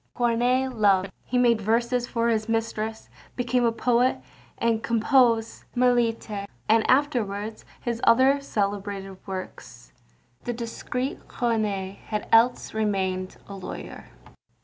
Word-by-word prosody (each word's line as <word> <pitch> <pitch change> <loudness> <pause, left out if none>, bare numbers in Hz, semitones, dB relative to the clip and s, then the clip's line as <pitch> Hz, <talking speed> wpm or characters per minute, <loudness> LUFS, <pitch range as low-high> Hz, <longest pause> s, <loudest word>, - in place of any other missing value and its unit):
Corneille 245 +2 +2
loved; 200 -5 +2
he 250 - -1
made 235 -3 +4
verses 235 +3 +1
for 230 -1 0
his 220 -1 0
mistress, 225 -1 -2 0.3
became 245 0 +1
a 235 - +3
poet, 245 +2 +2 0.6
composed 230 -1 +2
Mélite 230 -4 +1 0.2
and 220 +1 +3
afterwards 220 -6 0 0.2
his 235 -1 -3
other 265 +4 +5
celebrated 200 -4 -3
works. 185 - -8 0.5
The 240 - -2
discreet 250 +3 -4
Corneille 210 -5 -1
had 210 -1 -3
else 235 +2 +4
remained 190 -4 -1
a 200 - -8
lawyer. 190 -2 -8
225 Hz, 110 wpm, -25 LUFS, 205-245 Hz, 0.6 s, other